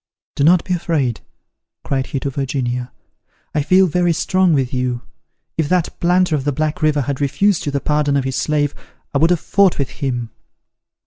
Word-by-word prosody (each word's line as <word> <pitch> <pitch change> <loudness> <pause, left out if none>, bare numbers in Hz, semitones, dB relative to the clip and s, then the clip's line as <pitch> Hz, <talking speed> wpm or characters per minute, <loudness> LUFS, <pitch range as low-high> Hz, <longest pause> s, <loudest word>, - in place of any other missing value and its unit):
"Do 140 - 0
not 170 +3 +5
be 185 - -2
afraid," 150 -9 -1 0.6
cried 135 -1 -1
he 135 - -3
to 140 - -2
Virginia; 125 -2 -2 0.6
"I 150 - +1
feel 185 +6 +4
very 175 0 +1
strong 185 +2 +2
with 135 -5 +1
you. 125 -1 -2 0.6
If 155 -2 +1
that 180 -2 0
planter 175 -1 +2
at 140 - -2
the 145 - 0
Black 155 +4 -2
River 155 -1 +2
had 140 +1 -3
refused 155 +6 +1
you - - 0
the 140 -1 -1
pardon 150 -1 +1
of 135 - 0
his 130 0 -3
slave, 145 0 0 0.4
I 140 - +2
would 165 +3 +4
have 175 -2 +2
fought 200 +1 +2
with 140 - -2
him." 125 -4 -2
145 Hz, 190 wpm, -19 LUFS, 135-170 Hz, 0.6 s, not